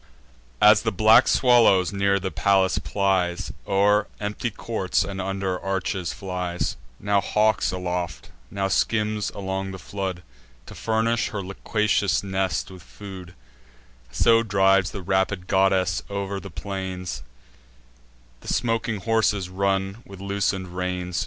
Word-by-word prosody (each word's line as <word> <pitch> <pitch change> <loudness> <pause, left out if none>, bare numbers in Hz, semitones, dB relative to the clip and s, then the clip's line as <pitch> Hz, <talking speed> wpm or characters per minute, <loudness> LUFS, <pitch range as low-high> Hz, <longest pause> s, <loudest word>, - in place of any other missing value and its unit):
As 105 0 +7
the - - 0
black 110 +5 +6
swallow 115 -7 +5
near 100 0 +1
the 95 0 -4
palace 95 -4 +2
plies; 90 +2 -1
O'er 100 +1 +3
empty 105 +3 -3
courts, 105 -3 -1
and 95 -1 -5
under 95 -1 -2
arches, 95 -2 -2
flies; 90 -2 -3 0.2
Now 100 0 +1
hawks 110 +1 +1
aloft, 90 -1 -4 0.2
now 100 -1 -1
skims 105 0 0
along 95 -1 -3
the 95 - -7
flood, 95 -2 -5 0.4
To - - -11
furnish 115 +1 0
her 100 -3 -4
loquacious 100 +1 0
nest 95 -1 -2
with 95 -1 -11
food: 95 -1 -11 0.7
So 115 - +4
drives 95 -3 +3
the 100 - -7
rapid 95 0 0
goddess 95 -2 +2
o'er 100 0 -3
the - - -9
plains; 95 -8 -5 1.2
The - - -15
smoking 115 -3 -1
horses 110 -4 +1
run 95 +2 -1
with 100 -1 -12
loosen'd 100 -1 -1
reins. 90 -1 -3
95 Hz, 125 wpm, -24 LUFS, 95-105 Hz, 1.2 s, As